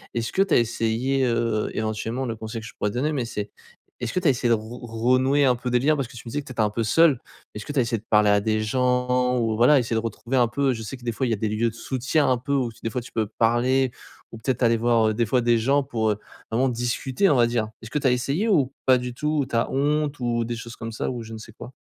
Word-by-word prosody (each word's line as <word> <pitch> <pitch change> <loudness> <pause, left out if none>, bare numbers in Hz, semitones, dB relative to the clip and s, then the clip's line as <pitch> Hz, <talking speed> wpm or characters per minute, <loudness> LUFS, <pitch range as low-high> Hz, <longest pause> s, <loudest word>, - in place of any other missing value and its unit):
est-ce 115 -1 -2
que 190 - +2
tu 195 -4 +3
as - - +7
essayé, 120 +3 0
heu, 115 -3 0
éventuellement, 110 +4 -2
le 115 -2 -3
conseil 110 +1 -6
que - - -10
je - - -12
pourrais 105 - -1
te 105 - -8
donner, 145 +5 0
mais 135 -5 -1
c'est 105 -3 -5 0.5
est-ce 120 -1 -3
que - - +1
tu 180 - 0
as - - +7
essayé 125 -2 +1
de - - +5
re 115 +2 -4 0.3
renouer 135 +3 +3
un 125 -2 +4
peu 125 +1 -4
des 125 - +3
liens? 150 +5 +3
Parce 135 -4 -2
que 120 - -15
tu 120 - -8
me - - -4
disais 145 - -2
que - - -17
tu - - -10
étais 120 - -1
un 105 - +2
peu 115 +2 -2
seul. 140 +4 +4 0.4
Est-ce 105 - -6
que 145 - -5
tu 145 - +1
as - - +5
essayé 115 0 0
de 110 - -13
parler 105 -1 +4
à 105 0 +4
des 110 +1 0
gens? 125 +2 +1
Ou 115 -2 0
voilà 125 +6 +5
essayer 115 -2 -2
de - - +2
retrouver 115 +3 -3
un 120 - +4
peu 135 +3 0
je 115 -3 -4
sais 130 +5 -6
que 125 - -18
des 120 - -1
fois 115 +4 -2
il 120 - -1
y - - +3
a - - +1
des 110 +1 -2
lieux 110 +2 0
de - - -19
soutien 130 +4 0
un 125 - +3
peu, 130 +4 -3
ou 130 -4 +1
f 115 - -14
des 115 - -2
fois 125 - -2
tu 120 - -13
peux 110 -1 0
parler 125 +3 +2 0.4
ou 115 - -9
peut-être 125 +2 -2
aller 115 -1 +4
voir, 115 -1 +3
heu, - - 0
des 115 +1 +1
fois 125 +3 +1
des 120 0 +3
gens 135 +5 +2
pour, 110 -4 -1
heu, 105 - -3 0.3
vraiment 130 +4 +2
discuter 125 +8 0
on - - +4
va 120 -2 +4
dire. 115 -2 -1
Est-ce 115 - -9
que 150 - -2
tu 145 - -3
as - - +4
essayé? 140 - 0
Ou 145 -10 +3
pas 130 -1 +5
du 125 0 -6
tout? 150 +3 -1
Ou - - -1
tu 120 - -5
as 115 - +1
honte? 145 +1 0
Ou 120 -1 0
des 120 +1 -3
choses 115 0 -8
comme 115 0 -6
ça? 110 - -3
Ou 120 -2 -5
je 110 0 -10
ne 110 - -7
sais 110 0 -12
quoi? 120 - -10
120 Hz, 320 wpm, -24 LUFS, 115-130 Hz, 0.5 s, as